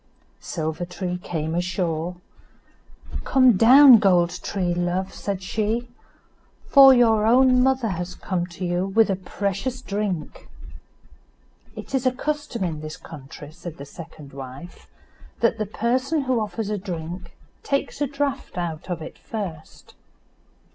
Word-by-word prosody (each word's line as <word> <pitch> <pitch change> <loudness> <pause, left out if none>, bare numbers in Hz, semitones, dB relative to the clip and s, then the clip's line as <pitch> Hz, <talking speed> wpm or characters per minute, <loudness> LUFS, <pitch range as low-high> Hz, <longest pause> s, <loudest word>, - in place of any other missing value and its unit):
Silver 160 0 -4
tree 180 0 -4
came 160 -3 -4
ashore. 175 -1 -2 1.1
"Come 255 -4 +5
down, 255 +4 +8
Gold 180 -4 +3
tree, 180 -3 -1
love," 175 +2 -2
said 195 -2 -4
she, 220 +4 -2 0.8
"for 275 -1 +9
your 225 -4 +4
own 255 +1 +5
mother 260 -3 +2
has 180 -1 -4
come 175 -2 -3
to 180 +1 -6
you 175 +2 0
with 215 +1 +3
a - - +1
precious 200 +7 -3
drink." 200 -8 -4 1.3
"It - - -9
is 260 -1 +1
a - - +4
custom 290 -4 -3
in 160 -4 -3
this 155 0 -7
country," 145 -1 -11
said 170 0 -9
the 140 - -8
second 150 -2 -12
wife, 135 +5 -10 0.5
"that 230 -2 +2
the 215 - -1
person 255 +8 0
who 255 -3 +1
offers 215 0 -3
a 210 - -2
drink 175 -1 -7 0.2
takes 275 +1 -2
a 290 - +2
draught 280 -7 -3
out 170 0 -4
of 170 -3 -3
it - - -10
first." 180 -8 -7
190 Hz, 140 wpm, -23 LUFS, 175-240 Hz, 1.3 s, for